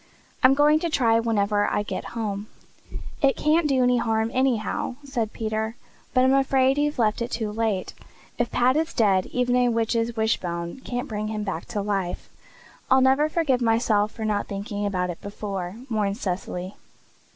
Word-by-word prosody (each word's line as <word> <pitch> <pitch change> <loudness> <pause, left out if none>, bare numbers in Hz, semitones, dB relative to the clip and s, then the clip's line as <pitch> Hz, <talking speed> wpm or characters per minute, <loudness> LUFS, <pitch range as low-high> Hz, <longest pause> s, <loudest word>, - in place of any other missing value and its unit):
I'm 265 0 +6
going 300 +2 +4
to 340 - -1
try 230 -7 +3
whenever 205 -2 +1
I 205 - 0
get - - -4
home." 205 -2 -3 0.7
"It 275 -2 +3
can't 310 +1 +2
do 260 -2 +3
any 250 0 +3
harm, 225 -1 0
anyhow," 255 -2 0
said 240 -6 -2
Peter, 220 0 -3 0.4
"but 255 - +5
I'm 260 +1 +4
afraid 270 0 +3
you've 295 0 0
left 220 -1 +1
it 235 - -2
too 220 -4 -3
late. 215 -3 -1 0.5
If 240 -1 +1
Pat 250 +2 +2
is 320 +1 -1
dead 195 -4 +3
even 250 0 0
a 250 -1 +3
witch's 230 0 0
wishbone 175 -4 -1
can't 245 -1 -4
bring 215 -1 -3
him 215 -1 -3
back 190 -5 -4
to 205 - -3
life." 195 -3 -3 0.6
"I'll 265 - +6
never 270 +4 +4
forgive 295 -6 +1
myself 225 -2 +2
for 220 - -5
not 210 -1 -1
thinking 205 +1 -3
about 180 -2 -1
it 170 - -10
before," 200 -3 -5
mourned 210 -4 -1
Cecily. 185 -2 -4
225 Hz, 175 wpm, -24 LUFS, 205-255 Hz, 0.7 s, I'm